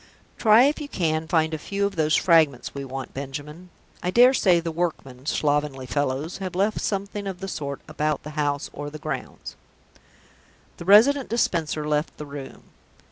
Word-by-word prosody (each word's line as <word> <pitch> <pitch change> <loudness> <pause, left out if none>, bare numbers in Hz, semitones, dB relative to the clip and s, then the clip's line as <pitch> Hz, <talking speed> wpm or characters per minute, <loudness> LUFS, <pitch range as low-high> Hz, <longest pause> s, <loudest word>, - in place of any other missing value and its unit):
"Try 220 +1 +6
if 290 +3 +1
you 295 - -5
can 160 - -1
find 160 -2 +1
a 155 - -3
few 200 +5 -2
of 200 - -3
those 155 -1 +2
fragments 160 -7 +3
that - - -27
we 140 - -4
want, 135 0 -6
Benjamin. 145 +6 -7 0.3
I 180 - -1
dare 245 +6 +6
say 180 -9 +4
the 165 0 -3
workmen 150 -6 -4
(slovenly 145 -4 0
fellows!) 145 +5 -2
have 185 -2 -5
left 205 +3 +1
something 200 0 -3
of 190 -2 -5
the 195 - -5
sort 140 -6 -5
about 150 -1 -2
the 150 - -7
house 145 -2 -1
or 145 0 -6
the 155 - -8
grounds." 150 -4 -6 1.2
The 170 - -9
Resident 245 +8 +6
Dispenser 160 -9 0
left 150 +1 -1
the 150 - -7
room. 140 -1 -9
155 Hz, 180 wpm, -24 LUFS, 145-195 Hz, 1.2 s, Try